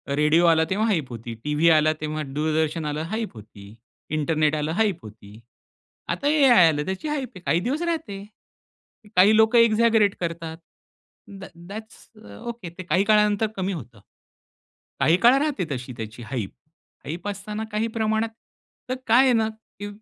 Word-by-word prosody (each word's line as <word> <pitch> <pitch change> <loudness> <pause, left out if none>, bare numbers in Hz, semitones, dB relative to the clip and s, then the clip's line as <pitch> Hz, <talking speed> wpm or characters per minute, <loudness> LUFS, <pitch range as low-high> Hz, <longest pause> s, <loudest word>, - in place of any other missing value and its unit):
Radio 150 +4 +3
आला 160 -1 +4
तेव्हा 215 +4 0
hype 160 - 0
होती, 115 0 -7
टीव्ही 150 +3 +2
आला, 155 -1 +4
तेव्हा 155 0 -3
दूरदर्शन 155 +1 -1
आलं 150 +1 -3
हाइप 220 - -3
होती. 105 -1 -13 0.4
इंटरनेट 155 0 +1
आलं 150 +1 -2
हाइप 205 -6 +2
होती. 105 0 -13 0.7
आता 285 - -1
एआय 270 - +6
आलं, 150 -2 0
त्याची 190 +11 -4
हाइप 285 -4 -3
आहे, 180 - -10
काही 165 - +2
दिवस 275 - -2
राहते. 315 -13 -3 0.9
काही 200 +4 +6
लोकं 220 +2 +4
एक्झॅगरेट 225 -2 +4
करतात. 165 -1 -5 0.7
दॅट् 195 -3 -11
दॅट्स 220 +2 -10 0.2
अ, - - -12
ओके. 230 -7 -7
ते 180 +2 -10
काही 185 +2 +1
काळानंतर 210 0 +3
कमी 190 0 -2
होतं. 120 - -9 1.0
काही 165 +3 +4
काळ 240 +5 +6
राहते 290 - -1
तशी, 125 -1 -5
त्याची 115 +2 -7
हाइप. 115 -5 -4 0.6
हाइप 170 +6 -6
असताना 205 +2 -5
काही 215 +2 -1
प्रमाणात 220 +1 0 0.6
तर 255 - -1
काय 240 +4 +6
आहे 255 -2 +4
ना, 220 -1 +2 0.3
की 205 - -5
180 Hz, 160 wpm, -24 LUFS, 150-220 Hz, 1.0 s, एआय